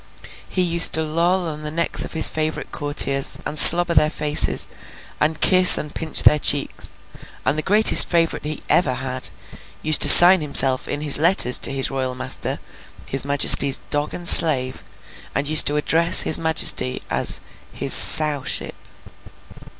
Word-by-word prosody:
He 185 Hz, -, -3 dB
used 170 Hz, -1 st, 0 dB
to 160 Hz, -, -2 dB
loll 170 Hz, +3 st, -5 dB
on 155 Hz, -1 st, -10 dB
the 150 Hz, -, -9 dB
necks 165 Hz, +2 st, -3 dB
of -, -, -12 dB
his 160 Hz, -, +2 dB
favourite 155 Hz, 0 st, -8 dB
courtiers, 140 Hz, -2 st, -2 dB
and 150 Hz, -, -5 dB
slobber 175 Hz, +3 st, +7 dB
their 155 Hz, -, -1 dB
faces, 150 Hz, -2 st, +3 dB, 0.5 s
and 155 Hz, +1 st, -4 dB
kiss 185 Hz, -1 st, +3 dB
and 150 Hz, -, -10 dB
pinch 160 Hz, -2 st, -3 dB
their 150 Hz, -, +1 dB
cheeks; 140 Hz, -1 st, -5 dB, 0.5 s
and -, -, -3 dB
the 155 Hz, -, -6 dB
greatest 210 Hz, +6 st, +4 dB
favourite 165 Hz, -1 st, -4 dB
he 150 Hz, +1 st, -9 dB
ever 130 Hz, -8 st, -3 dB
had, 130 Hz, -1 st, -7 dB, 0.5 s
used 155 Hz, -1 st, -1 dB
to -, -, +6 dB
sign 180 Hz, 0 st, +7 dB
himself 135 Hz, -3 st, +1 dB
in 145 Hz, -, -8 dB
his 145 Hz, -2 st, +3 dB
letters 165 Hz, -6 st, +2 dB
to -, -, -4 dB
his 135 Hz, -1 st, -5 dB
royal 130 Hz, -1 st, -7 dB
master, 130 Hz, +1 st, -7 dB, 0.5 s
His 135 Hz, -1 st, -6 dB
Majesty's 140 Hz, -1 st, +1 dB
'dog 145 Hz, 0 st, -6 dB
and 175 Hz, -1 st, -6 dB
slave,' 130 Hz, -8 st, +3 dB, 0.5 s
and 140 Hz, +1 st, -6 dB
used 155 Hz, 0 st, +1 dB
to 150 Hz, -, -4 dB
address 165 Hz, +4 st, +2 dB
his 155 Hz, -, +3 dB
majesty 160 Hz, -, -2 dB
as -, -, -1 dB, 0.3 s
'his -, -, -4 dB
Sowship. 150 Hz, -4 st, 0 dB
150 Hz, 160 wpm, -16 LUFS, 140-165 Hz, 0.5 s, slobber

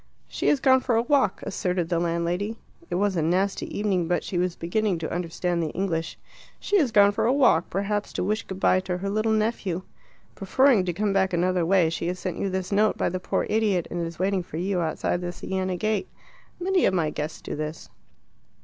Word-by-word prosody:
"She -, -, -3 dB
has 290 Hz, -, +4 dB
gone 260 Hz, -1 st, +5 dB
for 250 Hz, -2 st, 0 dB
a 225 Hz, -, +4 dB
walk," 270 Hz, -6 st, +1 dB
asserted 180 Hz, -3 st, -2 dB
the 170 Hz, -2 st, +1 dB
landlady. 175 Hz, +6 st, -1 dB, 0.3 s
It -, -, -2 dB
was 200 Hz, +1 st, +1 dB
a 165 Hz, -, +1 dB
nasty 185 Hz, +5 st, 0 dB
evening, 190 Hz, -5 st, -1 dB
but 175 Hz, -, 0 dB
she 175 Hz, -, -2 dB
was 180 Hz, -1 st, 0 dB
beginning 195 Hz, +2 st, 0 dB
to 160 Hz, -, -4 dB
understand 175 Hz, 0 st, -2 dB
the 160 Hz, -, -1 dB
English. 170 Hz, -3 st, -2 dB, 0.4 s
"She 410 Hz, -, +2 dB
has 275 Hz, -8 st, +1 dB
gone 205 Hz, -1 st, +6 dB
for 205 Hz, -, 0 dB
a -, -, +4 dB
walk 255 Hz, -, +3 dB
perhaps 205 Hz, +2 st, -2 dB
to -, -, -1 dB
wish 215 Hz, +4 st, 0 dB
good 190 Hz, 0 st, -6 dB
bye 185 Hz, -, +4 dB
to 185 Hz, -1 st, -3 dB
her 195 Hz, +2 st, -3 dB
little 215 Hz, +2 st, +1 dB
nephew. 215 Hz, -5 st, -1 dB, 0.5 s
Preferring 220 Hz, +1 st, +3 dB
to 175 Hz, -, -1 dB
come 205 Hz, +3 st, 0 dB
back 190 Hz, -1 st, +2 dB
another 175 Hz, 0 st, +1 dB
way, 180 Hz, -3 st, +3 dB
she 170 Hz, -, -3 dB
has 180 Hz, +1 st, -2 dB
sent 185 Hz, -2 st, -4 dB
you 195 Hz, -, -1 dB
this 185 Hz, 0 st, -3 dB
note 210 Hz, +1 st, +3 dB
by -, -, +1 dB
the 185 Hz, -, -3 dB
poor 180 Hz, -, -1 dB
idiot 210 Hz, -5 st, +1 dB
and 175 Hz, -, -2 dB
is 165 Hz, 0 st, -6 dB
waiting 190 Hz, +1 st, +1 dB
for 170 Hz, -3 st, -8 dB
you 180 Hz, +1 st, 0 dB
outside 165 Hz, +2 st, -1 dB
the 175 Hz, 0 st, -3 dB
Siena 185 Hz, 0 st, -3 dB
gate. 215 Hz, +1 st, -1 dB, 0.5 s
Many 370 Hz, +1 st, +2 dB
of -, -, +2 dB
my 160 Hz, -4 st, +1 dB
guests 150 Hz, +2 st, -4 dB
do -, -, -6 dB
this." 155 Hz, +1 st, -6 dB
185 Hz, 220 wpm, -25 LUFS, 175-210 Hz, 0.5 s, gone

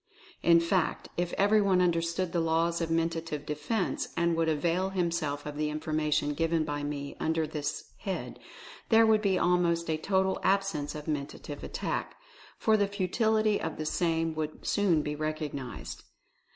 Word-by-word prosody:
In 170 Hz, 0 st, +6 dB
fact, 170 Hz, +1 st, 0 dB
if 175 Hz, 0 st, -1 dB
everyone 200 Hz, -2 st, +4 dB
understood 170 Hz, 0 st, +1 dB
the 175 Hz, -, 0 dB
laws 165 Hz, +1 st, +1 dB
of 165 Hz, -, -1 dB
Mentative 165 Hz, -2 st, -1 dB
Defence, 150 Hz, +7 st, -1 dB
and 170 Hz, 0 st, +2 dB
would 165 Hz, 0 st, +1 dB
avail 170 Hz, +5 st, +1 dB
himself 170 Hz, -6 st, -1 dB
of 150 Hz, -1 st, -6 dB
the 150 Hz, 0 st, 0 dB
information 150 Hz, -1 st, 0 dB
given 165 Hz, +1 st, +1 dB
by 145 Hz, -1 st, -3 dB
me 145 Hz, -1 st, -4 dB
under 160 Hz, 0 st, +1 dB
this 150 Hz, -1 st, -4 dB
head, -, -, -4 dB, 0.5 s
there 225 Hz, 0 st, +6 dB
would 220 Hz, -1 st, +4 dB
be 195 Hz, -3 st, +2 dB
almost 170 Hz, -2 st, +2 dB
a 155 Hz, -, +1 dB
total 190 Hz, +3 st, +1 dB
absence 190 Hz, -7 st, 0 dB
of 150 Hz, -1 st, -6 dB
Mentative 145 Hz, -1 st, -4 dB
Attack, -, -, -3 dB, 0.4 s
for 220 Hz, -1 st, +3 dB
the 200 Hz, -1 st, +2 dB
futility 215 Hz, +2 st, +1 dB
of 160 Hz, -, -3 dB
the 155 Hz, -, -3 dB
same 165 Hz, 0 st, 0 dB
would 155 Hz, -1 st, -5 dB
soon 180 Hz, -7 st, +2 dB
be 150 Hz, 0 st, -3 dB
recognized. 150 Hz, -4 st, -4 dB
165 Hz, 155 wpm, -29 LUFS, 155-185 Hz, 0.5 s, In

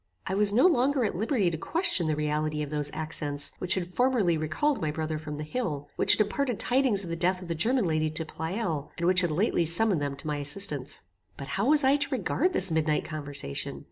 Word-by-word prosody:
I -, -, -3 dB
was 205 Hz, +1 st, +4 dB
no 245 Hz, -, +4 dB
longer 275 Hz, -6 st, +3 dB
at 205 Hz, -, -2 dB
liberty 210 Hz, -, 0 dB
to 160 Hz, -, -4 dB
question 335 Hz, -, 0 dB
the 155 Hz, -, 0 dB
reality 150 Hz, 0 st, -1 dB
of 145 Hz, -, -7 dB
those 150 Hz, -1 st, 0 dB
accents 150 Hz, -2 st, -1 dB
which 180 Hz, -, 0 dB
had 185 Hz, -2 st, -2 dB
formerly 210 Hz, -2 st, +1 dB
recalled 155 Hz, -, -1 dB
my 155 Hz, -, -1 dB
brother 155 Hz, 0 st, -3 dB
from 150 Hz, -1 st, -7 dB
the 150 Hz, -, -4 dB
hill; 150 Hz, -, -4 dB
which -, -, +5 dB
had -, -, +2 dB
imparted 245 Hz, +3 st, -1 dB
tidings 245 Hz, -6 st, +2 dB
of 170 Hz, -, -6 dB
the -, -, -1 dB
death 180 Hz, +2 st, +1 dB
of 180 Hz, -, -10 dB
the -, -, 0 dB
German 225 Hz, +8 st, +1 dB
lady 155 Hz, -2 st, 0 dB
to 155 Hz, +1 st, -1 dB
Pleyel; 160 Hz, -2 st, -4 dB
and 170 Hz, -, -2 dB
which 185 Hz, +1 st, +4 dB
had 175 Hz, -, 0 dB
lately 175 Hz, +2 st, +1 dB
summoned 175 Hz, 0 st, +3 dB
them 140 Hz, -1 st, -2 dB
to 140 Hz, -, -10 dB
my 150 Hz, -1 st, -2 dB
assistance. 145 Hz, -2 st, -1 dB, 0.3 s
But 140 Hz, 0 st, -8 dB
how 195 Hz, -, -1 dB
was 300 Hz, 0 st, +4 dB
I 270 Hz, +2 st, +4 dB
to 290 Hz, -, 0 dB
regard 290 Hz, +6 st, 0 dB
this 185 Hz, -1 st, +3 dB
midnight 155 Hz, -1 st, 0 dB
conversation? 145 Hz, -, -4 dB
170 Hz, 230 wpm, -27 LUFS, 150-225 Hz, 0.3 s, which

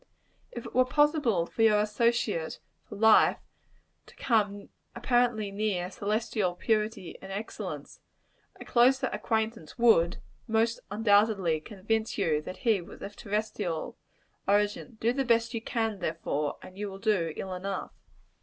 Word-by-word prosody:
If 240 Hz, -, -7 dB
it -, -, -9 dB
were 255 Hz, -, +5 dB
possible 275 Hz, -, +2 dB
for 225 Hz, -, -5 dB
your 215 Hz, -2 st, +5 dB
associate 210 Hz, -5 st, 0 dB, 0.3 s
for 210 Hz, -, -7 dB
life 220 Hz, +1 st, +5 dB, 0.7 s
to -, -, -17 dB
come 205 Hz, -4 st, 0 dB, 0.3 s
apparently 240 Hz, -4 st, +1 dB
near 195 Hz, -3 st, -1 dB
celestial 210 Hz, -3 st, -1 dB
purity 215 Hz, -2 st, -1 dB
and 190 Hz, -, -9 dB
excellence, 205 Hz, +3 st, -6 dB, 0.6 s
a -, -, -9 dB
closer 260 Hz, +2 st, +3 dB
acquaintance 220 Hz, -7 st, -2 dB
would, 190 Hz, -8 st, +4 dB, 0.3 s
most 225 Hz, +1 st, +1 dB
undoubtedly, 205 Hz, -5 st, +2 dB
convince 220 Hz, +5 st, -2 dB
you 160 Hz, -7 st, +1 dB
that 185 Hz, +4 st, -8 dB
he 220 Hz, -5 st, +3 dB
was 185 Hz, +4 st, -12 dB
of 205 Hz, +1 st, -7 dB
terrestrial 205 Hz, -5 st, -3 dB, 0.5 s
origin. 210 Hz, +4 st, +1 dB
Do 235 Hz, +2 st, +2 dB
the 270 Hz, +1 st, 0 dB
best 230 Hz, -1 st, +2 dB
you 230 Hz, -, -3 dB
can, 225 Hz, -3 st, -2 dB
therefore, 150 Hz, -3 st, -2 dB
and 185 Hz, -, -12 dB
you 205 Hz, -1 st, -3 dB
will 195 Hz, -, -8 dB
do 195 Hz, -6 st, +1 dB
ill 190 Hz, -, -5 dB
enough. 190 Hz, +1 st, -4 dB
210 Hz, 140 wpm, -29 LUFS, 190-230 Hz, 0.7 s, were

